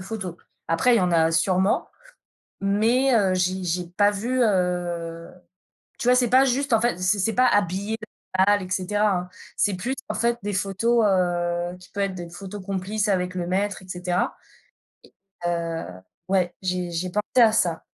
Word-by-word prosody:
photo. 190 -3 -6 0.3
Après, 235 +10 +3
il - - +4
y - - +2
en 180 -1 +1
a 165 -1 +4
sûrement, 185 +4 +1 0.7
mais 230 +7 +2
heu, 195 -4 +3
j'ai 185 +1 0
j'ai 180 0 -1
pas 205 +4 +3
vu, 240 +6 -1
heu, 175 -4 -1 0.7
tu - - -4
vois? 250 - +6
C'est 245 -2 +2
pas 260 +1 +6
juste 270 +1 0
en 225 - +5
fait, 240 -5 0
c 185 +3 +1
c'est 210 +4 +1
pas 255 0 +4
habiller 205 +2 0 0.4
l'animal 200 0 +3
et - - -13
cetera, 205 +3 +1
hein. 180 - -6 0.3
C'est 205 -2 +1
plus 240 +9 -3
en 215 - -2
fait 235 +2 0
des 205 +1 -3
photos, 205 +5 +1
heu, 175 -2 0
qui 180 - -16
peut 200 - -5
être 195 -1 0
des 175 -2 -7
photos 195 +2 -8
complices 200 +2 -2
avec 180 -2 0
le 180 -1 -3
maître 195 +1 -1
et 185 - -16
cetera, 180 0 -2 1.1
et 175 - +2
heu, 165 -1 -2 0.4
ouais, 185 -2 +1
j'ai 180 -1 -2
j'ai 170 +2 -2
pensé 210 +5 +2
à 220 - +6
ça. 175 -7 0
190 Hz, 185 wpm, -24 LUFS, 180-210 Hz, 1.1 s, vois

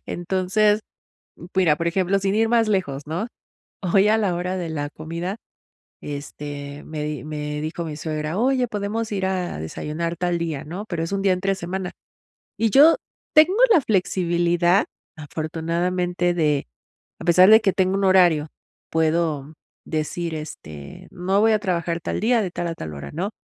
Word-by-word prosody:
Entonces 190 +4 +1 0.8
mira, 175 -5 +4
por 170 +2 -2
ejemplo, 190 +2 +1
sin 195 0 0
ir 225 +1 +2
más 230 -2 +3
lejos, 165 -9 -1
¿no? 170 +9 -3 0.6
Hoy 195 +3 +3
a 220 +1 +4
la 195 -5 +1
hora 180 +2 -2
de 175 -2 -3
la 145 -2 -3
comida 170 +6 -5 0.6
este, 145 0 -7
me 155 -1 -5
di 150 -4 -4
me 150 -1 -4
dijo 160 +2 -4
mi 155 -2 -5
suegra: 155 +2 -3
"Oye, 255 +1 +2
¿podemos 210 +1 -3
ir 195 -2 -1
a 185 - -2
desayunar 155 - -4
tal 175 -1 0
día", 160 -4 -3
¿no? 180 +7 -6
Pero 170 -3 -3
es 165 - -4
un 195 0 -1
día 190 -2 +4
entre 195 +1 0
semana 185 0 -4 0.7
y 225 - +2
yo 290 +8 +7 0.4
tengo 315 +6 +6
la 330 - +6
flexibilidad, 175 -2 +2 0.3
afortunadamente, 170 +3 -1
de, 150 - +1 0.5
a - - -7
pesar 180 +3 +6
de 220 +1 +9
que 195 -4 +2
tengo 190 0 +2
un 195 - 0
horario, 175 -5 +4 0.4
puedo 160 -2 0 0.3
decir 160 +1 -2
este, 75 - -9
no 190 +3 0
voy 225 0 +5
a 215 - +3
trabajar 170 -4 -1
tal - - -3
día 230 +1 +3
de 190 - -2
tal 175 0 -3
a 165 - -3
tal 80 - -7
hora, 70 - -7
¿no? 185 +7 -2
175 Hz, 170 wpm, -23 LUFS, 155-195 Hz, 0.8 s, de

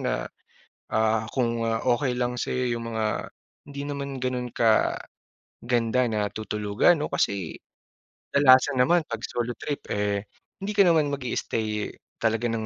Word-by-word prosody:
na, - - -1 0.7
ah, 110 0 +2
kung 115 -3 0
okey 125 +3 +1
lang 125 0 -1
sa'yo 125 -2 -1
yung 115 0 -5
mga 110 -1 -1 0.4
hindi 140 0 -6
naman 140 -1 -4
ganun 125 -1 -1 0.9
kaganda 120 +1 0
na 105 -1 0
tutulugan 105 +8 +2
oh. - - -8
Kasi 95 -5 -1 0.8
kadalasan 135 -1 +6
naman 170 +4 +4
'pag 115 -1 -5
solo 120 0 -2
trip 145 - -3
eh 100 0 -1 0.3
hindi 200 +2 -3
ka 200 - +6
naman 155 -4 +4
mag-i-stay 110 -5 -2 0.3
talaga 115 +1 +1
ng 115 -1 -2
120 Hz, 135 wpm, -26 LUFS, 110-130 Hz, 0.9 s, kadalasan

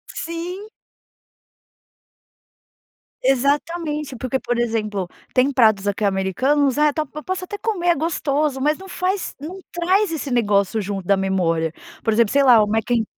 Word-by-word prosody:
Sim. 355 +5 -5 2.5
Exatamente. 295 +2 0
Porque, 255 +2 -2
por 245 -2 -2
exemplo, 215 -5 -1 0.3
tem 260 +2 +3
pratos 215 -6 +3
aqui 205 +2 -1
americanos, 255 +9 +1
ah 300 0 +4
tá 310 -1 -1
tó 300 +3 -9
eu - - -12
posso 370 0 -3
até 410 +3 -6
comer. 400 -6 -2
É 345 - +5
gostoso, 295 -3 -1
mas 300 +2 +2
não 385 +1 -11
faz 375 +1 -2
não 345 +7 -7
traz 365 +2 +1
esse 295 -4 -4
negócio 210 -2 +2
junto 195 -2 -4
da 200 +1 +3
memória. 165 -4 0 0.3
Por 225 - +1
exemplo, 225 -1 +3
sei 280 0 +4
lá, 240 -5 +7
o 210 - -1
Mac 220 +2 -1
in 235 -2 +3
270 Hz, 160 wpm, -21 LUFS, 215-330 Hz, 2.5 s, lá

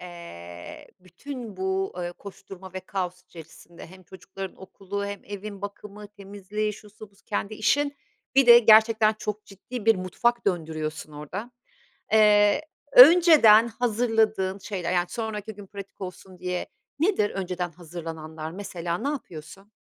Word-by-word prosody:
Eee, 90 - -10
bütün 220 - -9
bu, 190 0 -1
ııı, 175 0 -4
koşturma 190 -1 -12
ve 185 - -5
kaos 180 -1 -5
içerisinde, 170 0 -13
hem 185 +2 -15
çocukların 190 +2 -9
okulu 200 +1 -6
hem 200 -1 -6
evin 205 0 -8
bakımı, 205 0 -8
temizliği, 205 +1 -5
şusu 210 0 -13
busu, 200 - -28
kendi 205 0 -3
işin, 285 +6 +1 0.4
bir 270 -2 +5
de 235 0 +10
gerçekten 220 -1 +5
çok 210 0 -5
ciddi 210 +3 -9
bir 225 - +6
mutfak 235 +6 -1
döndürüyorsun 155 -3 -3
orada. 175 - -7 0.6
Eee, 210 +4 +5 0.3
önceden 270 -7 +8
hazırladığın 220 -4 0
şeyler, 185 -3 -4
yani, 175 0 +1
sonraki 220 -1 -5
gün 205 0 -12
pratik 200 0 -11
olsun 185 0 -9
diye, 180 0 -3 0.3
nedir 325 - +1
önceden 180 -2 -4
hazırlananlar? 160 -1 -8
Mesela, 175 -3 -4
ne 270 +6 -2
yapıyorsun? 195 - -8
200 Hz, 135 wpm, -25 LUFS, 180-215 Hz, 0.6 s, de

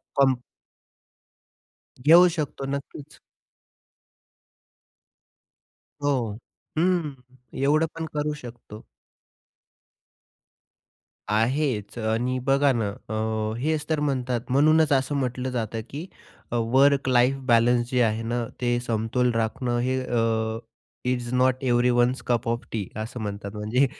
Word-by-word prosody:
Com 135 -1 +5 1.7
घेऊ 170 +4 +8
शकतो 145 -2 -3
नक्कीच. 140 +1 -9 2.9
हो, 145 - +2 0.7
हं, 170 -4 +1 0.5
एवढं 155 +3 +3
पण 165 0 -4
करू 150 0 0
शकतो. 115 -3 -11 2.5
आहेच 115 0 0
आणि 115 +3 0
बघा 140 +1 +4
ना, 115 -4 0 0.2
अ, - - -3 0.5
हेच 155 +2 -1
तर 155 -2 +1
म्हणतात, 130 -4 -1
म्हणूनच 155 +4 +4
असं 135 +2 +1
म्हटलं 130 -1 -2
जातं 115 -2 -3
की 155 +6 -6 0.4
अ, - - -1 0.2
वर्क 140 +1 +4
लाईफ 125 +1 +4
बॅलन्स 120 0 +3
जे 125 -1 +1
आहे 110 -1 +1
ना, 120 +1 -1 0.2
ते 120 -1 +1
समतोल 120 +1 0
राखणं 115 +2 -1
हे 130 +2 0
अ, 115 -2 0 0.5
is 125 -1 -1
not 130 +1 +2
everyone's 120 0 +2
cup 120 -1 0
of 115 0 -1
T 105 -5 -3 0.2
असं 120 +3 -7
म्हणतात. 100 -1 -5
म्हणजे 110 +6 +2
125 Hz, 110 wpm, -25 LUFS, 115-140 Hz, 2.9 s, घेऊ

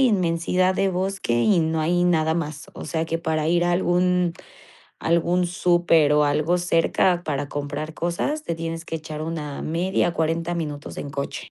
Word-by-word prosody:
inmensidad 185 -5 +2
de 195 +1 +1
bosque, 190 -5 -2
y 175 - +3
no 160 0 0
hay 175 +3 +2
nada 160 -2 +2
más. 155 -3 -4
O - - -7
sea 160 -1 -1
que 165 0 -2
para 160 -2 -1
ir 175 +1 +3
a 175 - +2
algún 180 0 +2 0.7
algún 170 +2 +1
súper 175 -4 +3
o 150 0 +4
algo 155 +4 +2
cerca 175 +1 +2
para 145 -1 -2
comprar 145 +2 -4
cosas, 175 - -2
te 170 - -2
tienes 165 0 -5
que 165 - -6
echar 155 -1 -7
una 155 -3 -4
media, 175 +2 0
40 165 +2 -1
minutos 150 -3 -5
en 145 - -5
coche. 140 0 -5
165 Hz, 170 wpm, -23 LUFS, 155-175 Hz, 0.7 s, o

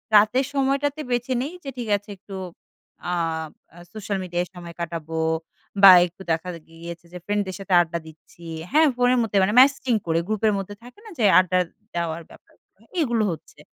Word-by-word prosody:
রাতের 215 +6 +5
সময়টাতে 280 +2 0
বেঁছে 245 +1 0
নেই 285 +6 -4
যে 275 - -5
ঠিক 240 -2 -4
আছে 205 +1 -18
একটু 195 +1 -11 0.8
আ - - 0 0.8
সোশ্যাল 205 -2 -3
মিডিয়ায় 175 0 -2
সময় 170 -1 -9
কাটাবো, 165 -1 -4 0.6
বা 195 - +12
একটু 175 +2 -12
দেখা 165 +3 -1 0.2
গিয়েছে 170 +1 -10
যে - - -6
ফ্রেন্ডদের 205 -2 -1
সাথে 195 -1 -3
আড্ডা 170 0 -3
দিচ্ছি। 160 +2 -17 0.3
হ্যাঁ? 310 +2 +5
ফোনের 250 +1 +3
মধ্যে, 210 -3 -1
মানে 200 +2 +1
ম্যাসেজিং 265 -2 +4
করে 165 0 +2
গ্রুপের 215 0 +1
মধ্যে, 195 +1 -6
থাকে 245 +11 -14
না - - -10
যে 220 - +3
আড্ডা 185 0 +1 0.4
দেওয়ার 170 -1 -2
ব্যাপারগুলো? - - -22 0.2
এগুলো 235 -6 +1
হচ্ছে। 160 - -10
200 Hz, 165 wpm, -23 LUFS, 170-245 Hz, 0.8 s, বা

